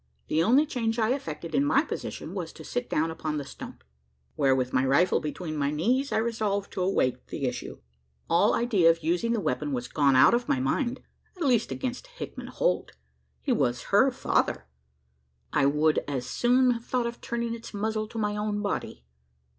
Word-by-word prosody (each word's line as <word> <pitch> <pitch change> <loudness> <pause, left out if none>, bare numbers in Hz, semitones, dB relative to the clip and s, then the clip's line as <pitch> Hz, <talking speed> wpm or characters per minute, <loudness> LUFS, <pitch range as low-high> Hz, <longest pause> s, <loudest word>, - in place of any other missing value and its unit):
The 160 - +2
only 255 - +4
change 235 -6 -2
I 225 0 +2
effected 165 - -6
in 275 - +3
my 285 0 +3
position, - - -6
was - - -4
to - - -11
sit 245 0 -3
down 160 +2 +1
upon 155 -1 -3
the 145 - -3
stump - - -10 0.5
where, 135 - +3
with 130 -1 -1
my 125 - +3
rifle 140 +7 +3
between 155 +1 -5
my 140 -1 0
knees, 240 - 0
I - - +1
resolved 215 -3 -1
to 185 - -3
await 130 -9 0
the 140 - -4
issue. 125 -1 -4 0.5
All 170 +5 +3
idea 205 -9 +3
of 165 -1 +1
using 175 +9 +1
the 230 - 0
weapon 145 -4 -2
was 125 -1 -3
gone 140 -2 +3
out 130 - +7
of 240 +1 0
my 130 - +2
mind 240 - -1 0.4
at 350 - -3
least, 245 -5 +2
against 255 - -4
Hickman - - -8
Holt. - - -1 0.5
He 280 - -1
was 125 - -1
her 260 +7 +6
father: 250 - 0 0.9
I 140 - +4
would 150 +2 +3
as 135 -4 -3
soon 250 - +3
have 230 -1 -3
thought 250 -2 0
of 235 0 -5
turning 235 0 -2
its 230 0 -8
muzzle 215 +1 -2
to 230 - -9
my 210 -1 0
own 210 0 -2
body. 200 - -3
205 Hz, 195 wpm, -27 LUFS, 150-240 Hz, 0.9 s, out